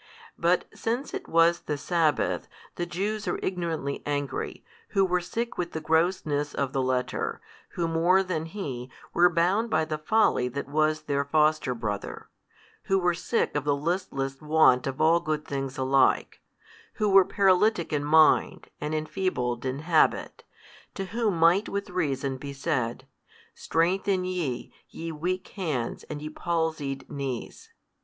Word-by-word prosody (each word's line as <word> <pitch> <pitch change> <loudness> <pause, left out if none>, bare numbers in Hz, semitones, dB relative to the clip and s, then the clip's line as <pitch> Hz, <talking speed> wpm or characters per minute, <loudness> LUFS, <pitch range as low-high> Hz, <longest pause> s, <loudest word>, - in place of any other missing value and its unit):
But 175 +2 +2
since 240 +5 -3
it - - -5
was 165 +1 +4
|313 - - -40
the 150 - -1
sabbath, 160 0 0 0.3
the 175 - -3
Jews 205 +4 -3
are - - 0
ignorantly 165 -6 -2
angry, 145 -1 -3 0.3
who 195 - +6
were 180 -1 +1
sick 230 +6 -4
with 170 -1 -2
the 160 - -2
grossness 160 -2 0
of 140 -1 -1
the 135 - +1
letter, 130 -1 -1 0.3
who 170 -1 -1
more 170 +4 +3
than 165 -4 -2
he, 135 -10 -5 0.2
were 175 +1 +6
bound 180 +7 +1
by 160 -7 +2
the 155 -1 -4
folly 155 - +2
that 140 +3 -5
was 155 +1 +1
their 140 -2 0
foster 150 -2 +2
brother, 105 -3 -5 0.6
who 195 - +2
were 180 -2 +2
sick 175 +4 -1
of 145 - 0
the 145 -1 +2
listless 140 -4 -2
want 150 -5 +4
of 135 0 -4
all 165 +2 +5
good 155 -2 -2
things 135 0 -4
alike, 135 0 +2 0.5
who 215 - 0
were 195 -1 +7
paralytic 195 -1 +2
in 145 -1 0
mind 155 +1 +4
and 150 +1 -2
enfeebled 155 -7 -2
in 130 +3 -3
habit, 160 0 +2 0.5
to 195 - -3
whom 225 -6 +1
might 170 +5 +4
with 200 -1 -4
reason 140 -6 -1
be 140 +1 -7
said, 130 -3 -2 0.5
Strengthen 185 +3 0
ye, 170 -9 -3 0.2
ye 165 0 -6
weak 180 +4 -3
hands 150 - -3
and 150 -1 -7
ye 155 - -4
palsied 160 -5 -2
knees. 135 -4 -5
160 Hz, 155 wpm, -27 LUFS, 140-180 Hz, 0.6 s, were